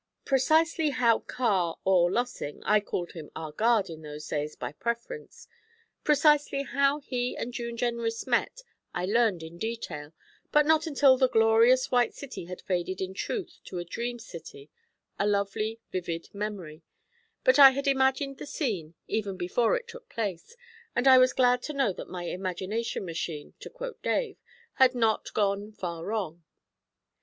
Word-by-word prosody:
Precisely 315 +4 +3
how 245 -4 +3
Carr 190 -9 0
or 180 -2 +4
Lossing 240 -10 -3
I 210 0 +5
called 180 -4 -4
him 160 -3 -9
'our 160 -1 -5
guard' 220 +3 +2
in 160 -2 -9
those 150 0 -8
days, 150 0 -3
by - - -5
preference 235 - -5 0.6
precisely 295 -2 +3
how 280 +1 +1
he 250 -2 -2
and 245 - -4
June 235 -1 -4
Jenrys 235 -1 -1
met, - - 0 0.3
I 180 - -1
learned 210 -4 +2
in 165 +2 -10
detail, 165 -10 -5 0.4
but 300 0 +5
not 320 +1 +3
until 275 -3 +5
the 260 -1 +4
glorious 230 +3 +4
White 245 -2 +2
City 275 -10 -8
had 180 +1 -8
faded 185 0 -2
in 190 0 -3
truth 385 - -4
to 180 - -7
a 175 - -4
dream 240 +7 -4
city 160 - -11 0.5
a 200 - +2
lovely 210 +2 -1
vivid 170 -2 -4
memory; 200 -7 -5 0.6
but 260 +2 +5
I 275 -1 +12
had 275 +2 -3
imagined 270 0 +1
the - - -7
scene, 190 - -3
even 200 -3 -2
before 180 +7 +1
it 480 -1 -9
took 485 0 -12
place, 205 - -4 0.4
and 245 +2 +2
I 260 -1 +9
was 255 0 +5
glad 250 -1 +3
to - - -3
know 270 -8 +1
that - - -9
my 180 -1 -5
'imagination 185 +5 -3
machine,' 165 -3 -5
to - - -9
quote - - -7
Dave, - - -1 0.4
had 260 -1 +6
not 225 -2 +1
gone 205 0 0
far 170 -5 -5
wrong. 180 -5 -3
225 Hz, 165 wpm, -28 LUFS, 180-260 Hz, 0.6 s, I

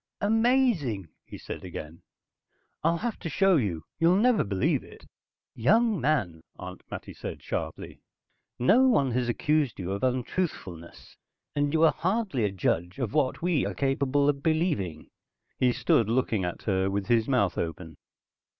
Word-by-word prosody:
"Amazing," 220 - +2 0.2
he - - -9
said - - -8
again. 80 +2 -8 0.8
"I'll 165 +2 +2
have 230 +3 -3
to 165 - -5
show 195 +1 +3
you. 90 - -1 0.2
You'll 170 +2 +4
never 230 +3 +3
believe 100 -2 0
it." - - -15 0.5
"Young 210 - +2
man," 105 - 0 0.2
Aunt - - -8
Mattie - - -7
said - - -7
sharply. - - -5 0.6
"No 225 - +5
one 140 - +3
has 120 0 0
accused 150 0 +1
you 90 0 -4
of 100 - -3
untruthfulness, 125 - -3 0.4
and 145 0 +1
you 160 +1 +2
are 165 - +6
hardly 190 - 0
a 100 - 0
judge 90 -2 -1
of 125 -6 -3
what 150 0 0
we 175 -5 +2
are - - -3
capable 140 +1 +1
of 140 -1 +1
believing." 155 - -1 0.5
He 125 -1 +4
stood 115 -2 +2
looking 115 -5 +1
at 90 - -5
her 95 -2 +1
with 100 0 -2
his 115 -1 +2
mouth 120 -10 +1
open. 80 -1 -5
130 Hz, 155 wpm, -27 LUFS, -, 0.8 s, are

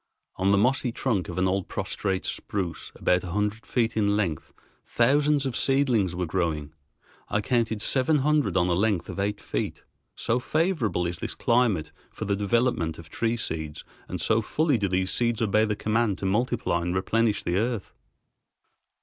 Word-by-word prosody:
On 95 +1 +2
the 100 - +5
mossy 125 +3 +2
trunk 110 -8 -1
of - - -6
an 95 0 +2
old 95 0 -1
prostrate 95 -2 -2
spruce 90 -5 -3
about 90 0 +1
a 85 -2 -5
hundred 105 +1 -1
feet 115 -2 0
in 105 -1 +2
length 85 -8 -2 0.3
thousands 145 +4 +2
of 130 -3 -2
seedlings 125 -10 +2
were 90 0 -1
growing. 80 -4 -2 0.6
I - - +1
counted 110 -1 0
seven 140 +3 +2
hundred 150 -5 +2
on 90 - +3
a 90 - +2
length 100 -1 +1
of - - -5
eight 100 +1 -1
feet, - - -4 0.3
so 115 +2 0
favorable 155 - 0
is 85 0 -3
this - - -4
climate 115 -10 +1 0.2
for - - -6
the 100 - +1
development 105 -5 +1
of 85 -1 -12
tree 115 0 -1
seeds 80 -7 -4 0.2
and - - -5
so 110 0 +2
fully 145 +3 +1
do 100 - +1
these 95 0 0
trees 120 -2 +1
obey 110 0 +3
the 105 -1 -1
command 110 -2 0
to 95 - -5
multiply 105 -3 0
and 90 +1 -2
replenish 105 +2 +1
the 85 +1 0
earth. 115 -1 -2
105 Hz, 175 wpm, -26 LUFS, 95-120 Hz, 0.6 s, the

